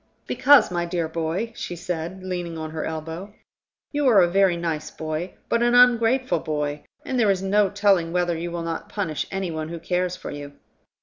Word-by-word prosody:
"Because, 285 -8 +5
my 175 -1 0
dear 170 -1 -2
boy," 165 +8 -3
she 175 - -5
said, 175 +1 -5
leaning 175 -3 -4
on 155 0 -5
her 160 0 -4
elbow, 160 +6 -6 0.6
"you 290 -2 +1
are 225 -6 +6
a - - +4
very 190 0 +3
nice 165 -3 -3
boy, 160 +3 -5
but 235 - +1
an 240 0 +3
ungrateful 245 -4 +4
boy, 150 -1 -3 0.2
and 260 -2 -1
there 220 -3 +4
is 195 -1 +1
no 200 +1 +3
telling 195 -5 +2
whether 175 -1 +1
you 170 +2 -4
will 170 0 -4
not 165 -1 -4
punish 185 -8 -3
any 195 -2 -3
one 160 0 -4
who 170 - -5
cares 180 +2 -1
for 185 - -7
you. 145 0 -8
175 Hz, 195 wpm, -24 LUFS, 160-200 Hz, 0.6 s, are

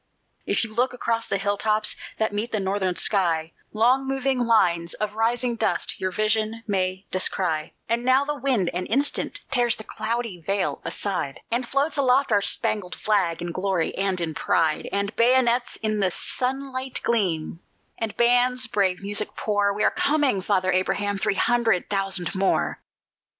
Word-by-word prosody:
If - - +3
you 220 -1 -4
look 245 +4 +1
across 230 -2 -1
the - - 0
hill 200 +1 -1
tops 215 0 +1 0.2
that 220 -2 0
meet 215 +4 -2
the 215 - 0
northern 190 -1 -1
sky, 165 -6 +1 0.2
Long 250 +5 +2
moving 270 -1 0
lines 175 -8 +2
of 210 -1 -3
rising 235 +2 0
dust - - -1
your 190 - 0
vision 215 +3 0
may 190 -2 -1
descry; 175 -4 0
And 235 +1 0
now 260 +2 +3
the 295 - -1
wind, 250 -10 0
an 180 +1 -3
instant, 280 +5 0
tears 240 -2 +2
the 220 - -9
cloudy 230 -5 -4
veil 195 +4 -1
aside, 185 -9 -3
And 240 +1 -1
floats 280 +4 0
aloft 270 -1 +3
our 205 -1 +4
spangled 195 -2 -1
flag 190 -6 0
in 175 - -4
glory 185 -1 -1
and 195 -2 0
in 165 -2 -2
pride, 155 +1 0
And 200 +1 -2
bayonets 245 0 +3
in 215 -1 0
the 195 -2 +2
sunlight 260 +5 -3
gleam, 175 -8 -1 0.4
and 225 -2 -2
bands 245 +1 +3
brave 195 -5 0
music 205 +1 -1
pour: 205 -1 +1
We 210 +1 -2
are - - +4
coming, 285 -9 +1
Father 185 -1 +1
Abraham, 200 +2 0
three 195 - 0
hundred 230 -5 +1
thousand 195 -3 0
more! 190 0 0
215 Hz, 165 wpm, -24 LUFS, 190-240 Hz, 0.4 s, our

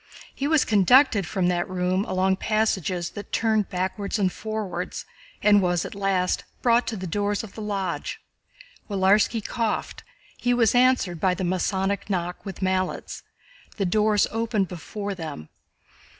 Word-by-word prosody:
He 275 - -2
was 315 -1 +3
conducted 210 - +4
from 190 -2 -1
that 175 +1 -1
room 185 +2 0
along 190 +1 +1
passages 190 -5 0
that 205 - -9
turned 220 -3 +1
backwards 190 +3 -2
and 190 -3 +1
forwards 210 -5 -4 0.4
and 205 -1 +6
was 175 -2 +1
at - - -7
last 195 -2 0 0.2
brought 240 0 +3
to 225 - -3
the 185 - -5
doors 205 +4 -1
of 210 - -10
the 220 - -8
Lodge. 195 -4 -3 0.7
Willarski 200 +3 +3
coughed, 230 -3 -2 0.3
he 245 0 +1
was 230 -3 +3
answered 245 -9 +3
by 185 +2 +2
the 185 - -4
Masonic 190 +3 -1
knock 180 -2 -2
with 195 -1 -6
mallets, 185 0 -1 0.6
the 200 - 0
doors 210 +2 +3
opened 225 -3 0
before 200 +4 -5
them. 155 - -7
195 Hz, 150 wpm, -25 LUFS, 185-215 Hz, 0.7 s, and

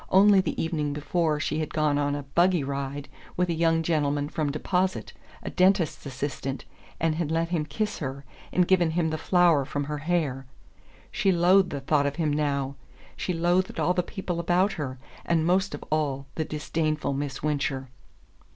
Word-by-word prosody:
Only 195 0 +6
the - - -3
evening 150 -3 -1
before 155 +1 0
she 150 +1 -1
had 155 - -4
gone 150 -2 +2
on 145 0 0
a 145 - -4
"buggy 170 +4 +2
ride" 140 +1 -4 0.3
with 180 0 +1
a - - +1
young 165 0 +2
gentleman 145 -3 0
from 150 -2 -1
Deposit 180 +5 -1 0.3
a - - -5
dentist's 185 -5 +2
assistant 135 0 -4 0.3
and 165 -1 +2
had 160 -1 -2
let 165 +1 0
him 165 -4 0
kiss 215 +2 -2
her, 140 -1 -5 0.3
and 180 -1 +2
given 180 -3 +4
him 160 0 0
the 155 - -3
flower 175 -5 +4
from 145 +2 -3
her 150 +1 -4
hair. 145 -5 -1 0.6
She 195 - +2
loathed 180 +2 +4
the 140 - -4
thought 145 +1 +2
of 140 - -3
him 155 -3 0
now: 140 -2 -1 0.4
she - - -2
loathed 175 +2 +1
all 180 - +2
the 180 - +1
people 180 -1 -4
about 180 +4 +2
her, 135 -5 -4 0.3
and 165 -2 +1
most 190 +3 +2
of - - -9
all 140 -3 0
the 160 - -2
disdainful 155 -1 -1
Miss 140 -1 -4
Wincher. 140 -3 -1
155 Hz, 180 wpm, -26 LUFS, 145-175 Hz, 0.6 s, Only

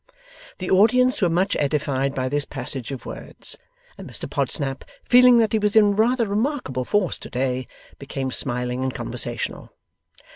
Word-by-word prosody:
The 185 - -4
audience 250 +7 +4
were 180 - +3
much 185 +4 +1
edified 140 -2 -1
by 130 -1 -1
this 145 +2 +1
passage 130 -2 -3
of 135 - -7
words; - - -4 0.4
and - - -9
Mr - - -4
Podsnap, 135 -3 -1 0.2
feeling 250 0 +6
that 225 -2 +2
he 220 - +3
was 210 0 0
in 205 -2 +5
rather 235 +3 +2
remarkable 205 - -2
force 205 +1 0
to - - -9
day, 130 0 -2 0.3
became 135 -1 -4
smiling 125 0 0
and 130 0 -1
conversational. - - -3
150 Hz, 155 wpm, -23 LUFS, 130-215 Hz, 0.4 s, feeling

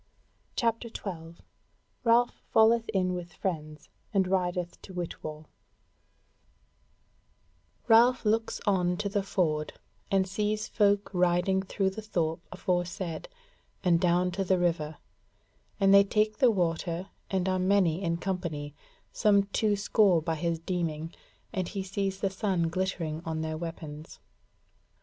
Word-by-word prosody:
CHAPTER 230 -1 0
12 170 -6 -7 0.6
Ralph 235 +1 +3
Falleth 225 +1 +4
in 185 -2 +1
With 175 -1 -6
Friends 155 -5 -4 0.2
and 195 -2 +2
Rideth 180 -2 -1
to 190 - -11
Whitwall 155 -3 -5 2.4
Ralph 240 +2 +5
looks 225 +1 +1
on 180 -3 +2
to 205 +1 -2
the 200 0 0
ford 155 -6 -1 0.4
and 195 -2 +2
sees 210 +3 -1
folk 205 -3 +2
riding 180 +1 +2
through 190 0 -1
the 220 - -7
thorp 165 -6 -1
aforesaid 175 - -2 0.6
and 170 -2 +3
down 180 0 +2
to 195 +2 -1
the 185 0 +2
river, 165 -3 0 0.8
and 195 0 +5
they 200 0 +9
take 215 +1 0
the 255 - +6
water 175 -2 -1 0.2
and 190 -1 0
are 185 0 +1
many 185 -2 +2
in 170 -3 0
company, 170 -5 -3 0.4
some 205 -2 +4
two 210 -2 +2
score 200 -2 +3
by 160 +1 -2
his 165 +1 -1
deeming, 165 -2 -3 0.4
and 185 -4 -1
he 195 0 -4
sees 195 0 -3
the 195 - +1
sun 190 -4 0
glittering 165 -3 -2
on 160 -1 -3
their 160 0 -3
weapons. 155 -2 -7
185 Hz, 130 wpm, -29 LUFS, 170-200 Hz, 2.4 s, they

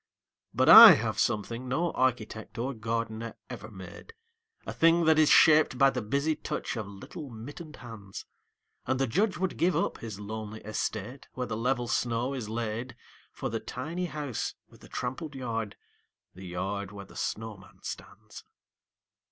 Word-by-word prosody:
But - - +1
I - - +13
have - - -2
something 115 +4 -1
no 165 +7 0
architect 110 -4 -2
or 130 +4 -2
gardener 115 0 -4 0.2
ever 110 +2 -8
made, 95 - -11 0.5
A - - -5
thing 165 +1 +4
that 160 0 +5
is 155 - +5
shaped 155 -4 +6
by 135 +1 +5
the - - -3
busy 140 +8 0
touch - - -4
of 110 -4 -4
little 100 - -9
mittened 145 +8 -9
hands: 110 -5 -10 0.6
And 130 - 0
the 135 - +2
Judge 195 - 0
would 190 0 -2
give 175 +2 +2
up - - -1
his 110 -4 -7
lonely 110 +1 -6
estate, 110 +4 -4
where 125 - -3
the 115 - -4
level 120 +2 0
snow 120 +2 -1
is 120 -6 -5
laid 115 +2 -4 0.4
For - - -4
the 115 - -2
tiny 160 +12 -4
house 145 -7 -4
with - - -20
the - - -14
trampled 130 +4 -5
yard, 115 -5 -4 0.6
the 95 +1 -10
yard 95 +3 -4
where 100 -1 -9
the - - -17
snowman 105 -4 -6
stands. - - -9
115 Hz, 160 wpm, -29 LUFS, 110-135 Hz, 0.6 s, I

